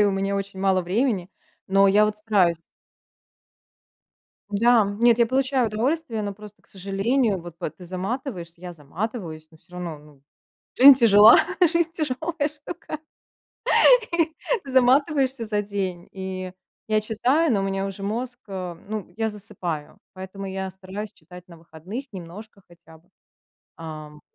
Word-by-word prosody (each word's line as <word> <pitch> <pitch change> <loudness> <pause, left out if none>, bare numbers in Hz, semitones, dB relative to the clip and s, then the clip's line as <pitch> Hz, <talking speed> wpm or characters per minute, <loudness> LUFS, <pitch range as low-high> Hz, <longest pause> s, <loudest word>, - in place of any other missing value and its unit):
и - - +6
у 205 - +3
меня 195 +1 -1
очень 195 -1 -5
мало 190 -1 +2
времени, 195 0 0 0.4
но 195 +1 +4
я 205 +2 +5
вот 210 0 -1
стараюсь. 200 -6 +2 1.9
Да, 230 +2 +4 0.2
нет, 235 -1 +5
я 235 - +5
получаю 260 0 +1
удовольствие, 230 +2 -1
но 200 -1 -4
просто, 210 0 -14
к - - -32
сожалению, 200 +3 0
вот 170 -1 -11
п - - -3
ты 180 - -14
заматываешься, 185 - -5
я 180 -1 -7
заматываюсь, 165 - -6
но 160 - -18
всё 175 - -28
равно, 175 -3 -6
ну, 145 -2 -19 0.6
жизнь 275 +1 +10
тяжела, 220 -2 +8 0.2
жизнь 335 -1 +3
тяжелая 310 0 -2
штука, 300 +1 -8 1.7
и - - -9
заматываешься 265 0 +3
за 210 -1 -1
день, 190 -4 -4
и 190 -1 -6 0.4
я 215 0 +2
читаю, 250 +8 +1
но 200 - +2
у - - -1
меня 195 0 -2
уже 195 0 -7
мозг, 245 +5 -4
э, 185 -3 -5
ну, 210 -5 -5
я 225 0 0
засыпаю, 190 -7 -6 0.2
поэтому 190 +1 -8
я 190 0 -4
стараюсь 195 +3 -8
читать 180 +1 -14
на 170 -2 -14
выходных 170 - -8
немножко 195 +3 -10
хотя 165 -2 -18
бы. 165 - -31 0.7
Ам. 155 -2 -9
200 Hz, 150 wpm, -24 LUFS, 180-235 Hz, 1.9 s, жизнь